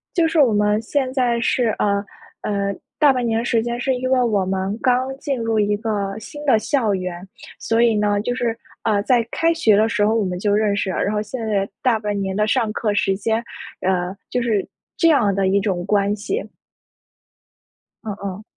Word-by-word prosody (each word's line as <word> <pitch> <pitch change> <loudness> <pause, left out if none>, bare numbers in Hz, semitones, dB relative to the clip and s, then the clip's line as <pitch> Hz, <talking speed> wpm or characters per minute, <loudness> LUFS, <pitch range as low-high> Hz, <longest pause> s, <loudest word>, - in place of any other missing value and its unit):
就 335 -2 +3
是 325 -1 +1
我 245 -7 +5
们 210 +1 +2
现 260 +2 -1
在 245 -3 +1
是， 235 0 +1
呃， 200 0 +1 0.4
呃， 200 -1 -1 0.2
大 290 -3 +6
半 250 -2 -1
年 225 0 0
时 230 -1 +1
间 240 0 -3
是 260 +1 0
因 255 +1 -2
为 255 -1 +4
我 210 -6 +1
们 190 +2 -2
刚 255 +1 +1
进 275 -4 -2
入 225 -1 0
一 205 0 +2
个 205 -2 -2
新 295 +7 -9
的 225 -6 +4
校 225 -4 0
园， 180 -1 -4 0.3
所 225 +1 +1
以 230 -2 +4
呢 205 -1 +1
就 245 +3 -2
是， 235 -2 -1 0.3
呃， 210 -3 +2
在 240 -2 +2
开 330 +1 +2
学 225 -11 +3
的 220 +1 +4
时 210 -2 +1
候 220 - +2
我 220 -3 +1
们 180 -1 -3
就 205 +2 0
认 210 -1 +2
识 200 -2 -1
了。 - - -3
然 205 - 0
后 210 - 0
现 225 +1 -5
在 200 -2 0
大 250 -4 +3
半 210 -2 -3
年 190 0 -2
的 210 0 +2
上 225 -1 +1
课 210 -2 -1
时 195 -1 +1
间， 220 +3 -1 0.4
呃， 185 0 0
就 250 - -1
是 220 -4 0 0.3
这 330 - +4
样 220 -10 +3
的 195 0 +1
一 200 +1 +2
种 185 -4 -2
关 205 0 +2
系。 385 - -3 1.6
嗯 210 -2 -4
嗯。 200 +2 -5
215 Hz, 225 characters per minute, -21 LUFS, 200-245 Hz, 1.6 s, 大